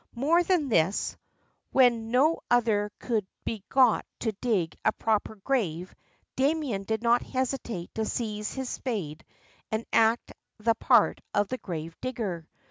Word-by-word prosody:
More 305 +8 +3
than 345 -5 +1
this, 185 -2 +1 0.3
— - - -44
when 240 -4 +4
no 280 +7 +3
other 220 -4 +2
could 220 -5 -1 0.2
be 215 -4 -3
got 255 -4 +4 0.2
to 225 - 0
dig 195 -6 -1
a 220 - +4
proper 220 0 -1
grave, 195 - -2 0.4
Damien 270 -8 0
did 220 +2 -2
not 235 +1 +4
hesitate 250 -8 -3
to 220 - -1
seize 210 -2 -3
his 265 -1 -3
spade 180 - -4 0.5
and 220 +1 -1
act 225 +1 +3 0.2
the 230 +1 +2
part - - +3
of 205 -1 +2
the 255 - -3
grave 165 -2 -6
digger. 200 -10 -3
225 Hz, 145 wpm, -28 LUFS, 205-255 Hz, 0.5 s, when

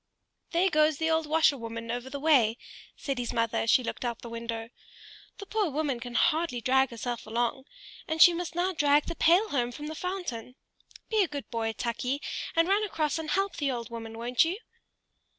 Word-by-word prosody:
"There 355 +2 +2
goes 305 -1 +3
the 320 +1 0
old 320 -1 +1
washerwoman 230 -7 +1
over 245 +2 -4
the 280 +1 -5
way," 260 -7 +4 0.4
said 275 -3 -3
his 240 - -2
mother, 230 -1 0
as 225 - -1
she 255 - +5
looked 235 - -5
out 240 -1 -1
of - - -21
the 235 - -7
window. 230 0 -5 0.7
"The 400 - -8
poor 420 -2 0
woman 285 -3 -1
can 245 0 -8
hardly 320 -2 +2
drag 265 +2 +3
herself 235 0 -5
along, 240 +4 -1 0.4
and 315 0 -2
she 350 +1 +9
must 335 -1 -4
now 365 +2 +1
drag 290 -2 +3
the - - -4
pail 360 +8 +4
home 245 -3 0
from 295 +5 -8
the 310 - -5
fountain. 315 - -5 0.6
Be 435 -1 +3
a - - -1
good 290 -2 -6
boy, 225 -1 -1
Tukey, 250 +4 -2 0.4
and 330 +1 +4
run 400 +3 +3
across 315 -7 -1
and 315 -1 -5
help 390 +2 0
the 285 -3 0
old 235 -3 -4
woman, 225 -1 -7
won't 240 +1 +2
you?" 335 +4 -2
280 Hz, 205 wpm, -28 LUFS, 235-325 Hz, 0.7 s, she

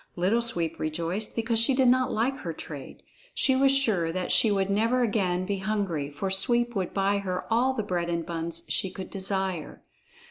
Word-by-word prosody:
Little 190 +7 +2
Sweep 170 -8 -1
rejoiced 170 +7 -3
because 230 0 0
she 245 +4 +3
did 260 -1 +3
not 255 +1 +3
like 255 +5 0
her 170 - -5
trade; 145 -3 -9 0.3
she 265 - +3
was 270 +1 +4
sure 215 -12 +2
that 180 +1 -3
she 225 - +5
would 195 -2 +1
never 230 +5 +2
again 185 -5 0
be 200 0 -2
hungry, 190 -8 -2
for 190 +7 -4
Sweep 240 +4 +2
would 185 -3 -2
buy 200 +1 +1
her 185 -2 -3
all 255 +3 +2
the 220 - -1
bread 175 -4 -2
and 170 -1 -2
buns 165 0 -4
she 190 - 0
could 190 0 -8
desire. 190 -4 -2
195 Hz, 190 wpm, -27 LUFS, 175-230 Hz, 0.3 s, she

